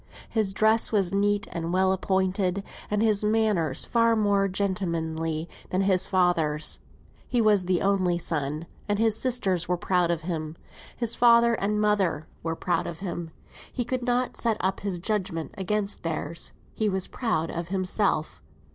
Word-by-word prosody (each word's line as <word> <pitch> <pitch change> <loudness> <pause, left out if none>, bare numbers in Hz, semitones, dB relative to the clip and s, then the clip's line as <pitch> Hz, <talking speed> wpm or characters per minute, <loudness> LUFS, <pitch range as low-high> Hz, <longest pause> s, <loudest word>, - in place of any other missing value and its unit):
His 215 -4 0
dress 220 +3 +3
was 200 -4 +2
neat 205 0 +1
and 170 -1 -3
well 190 +1 +3
appointed, 190 0 0 0.3
and 210 +1 +1
his 215 -2 +3
manners 210 -9 +1
far 230 -1 +3
more 200 -2 +2
gentlemanly 165 -5 -2 0.2
than 185 - 0
his 190 -2 +2
father's. 165 -5 +1 0.5
He 245 - 0
was 210 -4 +4
the 180 -1 +1
only 190 -3 +2
son, 155 -2 -2 0.2
and 205 - +1
his 220 0 +3
sisters 205 -8 0
were 180 - 0
proud 180 -1 +1
of 170 -1 0
him; 160 -2 -4 0.4
his 235 -1 0
father 235 -1 +5
and 210 -1 0
mother 200 -7 +1 0.2
were 165 0 -2
proud 175 +2 -1
of 170 - -6
him: 175 -3 -4 0.4
he 245 - -2
could 255 +1 -2
not 245 +1 0
set 225 -2 0
up 190 +1 -1
his 195 -3 -2
judgment 185 -3 -2
against 200 +1 -2
theirs; 165 0 -2 0.2
he 215 -1 0
was 190 -1 +1
proud 165 -10 -2
of 170 0 -4
himself. 185 -3 0
190 Hz, 160 wpm, -26 LUFS, 170-210 Hz, 0.5 s, father